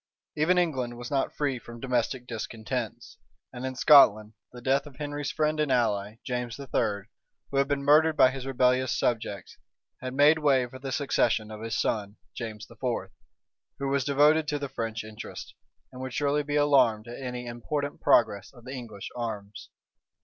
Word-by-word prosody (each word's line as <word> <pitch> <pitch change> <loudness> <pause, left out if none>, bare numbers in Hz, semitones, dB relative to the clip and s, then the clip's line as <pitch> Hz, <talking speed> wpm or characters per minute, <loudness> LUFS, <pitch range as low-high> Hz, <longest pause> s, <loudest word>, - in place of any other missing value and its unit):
Even 160 +4 +3
England 130 -9 0
was 120 +2 -7
not 135 -1 0
free 140 -4 -1
from 120 0 -11
domestic 125 0 -1
discontents; 115 0 -5 0.4
and 125 +1 -4
in 130 - -5
Scotland, 110 -7 +6 0.2
the 125 - -10
death 135 +4 +1
of 140 - -13
Henry's 145 0 -4
friend 155 0 0
and 150 -3 +1
ally, 105 -4 +1
James 125 0 -3
III., 110 -7 -1 0.5
who 140 - -1
had 140 0 +3
been 140 -1 -1
murdered 155 +2 +5
by 130 -2 +6
his 135 0 -6
rebellious 130 -1 +2
subjects, 110 -5 -2 0.4
had 130 0 -5
made 150 +3 +6
way 135 -4 +3
for 130 +2 -11
the 135 0 -5
succession 115 -6 +1
of 110 0 -8
his 115 -1 -2
son, 105 -1 -1 0.2
James 110 -3 -6
IV., - - -17 1.0
who 140 0 -2
was 140 -1 +1
devoted 150 +3 +4
to 145 - 0
the 140 -1 -4
French 115 -4 -4
interest, 110 0 -9 0.4
and 130 0 -9
would 130 -2 -5
surely 145 0 +1
be 145 0 -3
alarmed 130 -7 +3
at 120 +3 -8
any 125 -1 -5
important 140 +5 -4
progress 100 -3 +3
of 120 -3 -16
the 130 - -7
English 115 -6 -7
arms. 105 -4 -6
130 Hz, 175 wpm, -27 LUFS, 115-140 Hz, 1.0 s, Scotland